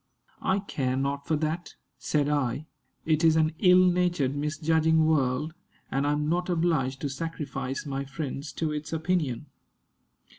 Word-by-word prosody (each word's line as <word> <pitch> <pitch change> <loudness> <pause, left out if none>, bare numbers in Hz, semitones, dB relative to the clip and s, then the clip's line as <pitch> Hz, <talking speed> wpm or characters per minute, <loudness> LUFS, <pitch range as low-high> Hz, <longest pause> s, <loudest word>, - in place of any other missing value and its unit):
"I 190 +1 +2
care 130 -9 -2
not 140 +1 -2
for 160 - +2
that," 160 +3 -3 0.2
said 145 -2 +1
I; 145 -1 0 0.4
"it 155 0 +2
is 160 -1 +6
an 155 -1 +2
ill 185 -1 +6
natured, 175 -6 +1
misjudging 160 +2 +2
world, 150 0 +1 0.4
and 140 +1 +1
I - - +2
am 150 0 -1
not 175 +3 0
obliged 160 -7 +1
to 145 - -1
sacrifice 135 -2 -4
my 140 -1 -3
friends 140 +1 -5
to 160 -2 -1
its 150 0 -4
opinion. 160 -5 -1
150 Hz, 150 wpm, -27 LUFS, 140-165 Hz, 0.4 s, is